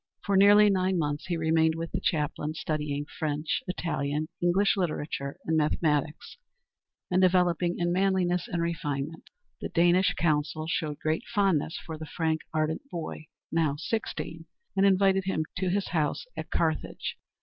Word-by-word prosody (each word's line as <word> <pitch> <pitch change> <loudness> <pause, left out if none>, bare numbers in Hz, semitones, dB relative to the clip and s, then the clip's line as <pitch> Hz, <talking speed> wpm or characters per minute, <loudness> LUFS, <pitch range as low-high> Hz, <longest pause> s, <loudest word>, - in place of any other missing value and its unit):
For 200 - +1
nearly 205 +2 +7
nine 185 -1 +1
months 145 -2 -2
he 175 -1 -1
remained 160 0 +2
with 165 0 -5
the - - -1
chaplain, 150 0 -1
studying 150 -2 -2
French, 150 0 -2
Italian, 155 -4 -2
English 180 +4 +3
literature, 150 -6 -2
and 160 - +1
mathematics, 150 -1 0 0.7
and 185 +1 +3
developing 180 -1 +3
in 175 0 0
manliness 185 -2 +1
and 170 -1 -1
refinement. 160 -2 -3 0.3
The - - -4
Danish 175 +2 +3
consul 155 -1 0
showed 155 -2 -2
great 155 +2 -1
fondness 195 -8 +1
for 160 -2 -6
the 155 - -7
frank, 160 -1 -1
ardent 155 0 0
boy, 160 - -6 0.2
now 160 -4 +1
sixteen, 165 -2 -4 0.3
and 195 0 +4
invited 195 0 +3
him 160 -5 0
to 185 0 0
his 200 +2 0
house 155 - 0
at - - -6
Carthage. - - -1
165 Hz, 150 wpm, -28 LUFS, 155-180 Hz, 0.7 s, nearly